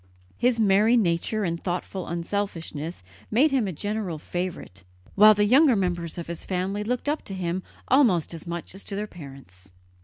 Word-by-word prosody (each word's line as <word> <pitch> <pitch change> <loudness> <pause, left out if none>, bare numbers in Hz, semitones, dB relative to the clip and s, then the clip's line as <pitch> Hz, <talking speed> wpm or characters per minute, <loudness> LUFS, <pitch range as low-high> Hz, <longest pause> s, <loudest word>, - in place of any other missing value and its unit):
His 245 -1 +1
merry 215 +3 +4
nature 200 +2 0
and 170 -2 -2
thoughtful 180 +1 -3
unselfishness 170 - -4 0.3
made 270 +8 +3
him 255 -6 +1
a - - -2
general 205 0 -3
favourite, 175 - -5 0.3
while 215 +1 +7
the 205 0 +3
younger 265 +4 +5
members 175 -4 -2
of 170 - -4
the 170 - -4
family 190 +4 -2
looked 250 +5 -2
up 300 +2 0
to 195 - -5
him 180 0 -2 0.3
almost 225 - +3
as 165 +1 -8
much 170 0 -5
as 195 - -7
to 200 - -4
their 205 +1 -2
parents. 135 - -12
190 Hz, 175 wpm, -25 LUFS, 170-215 Hz, 0.3 s, while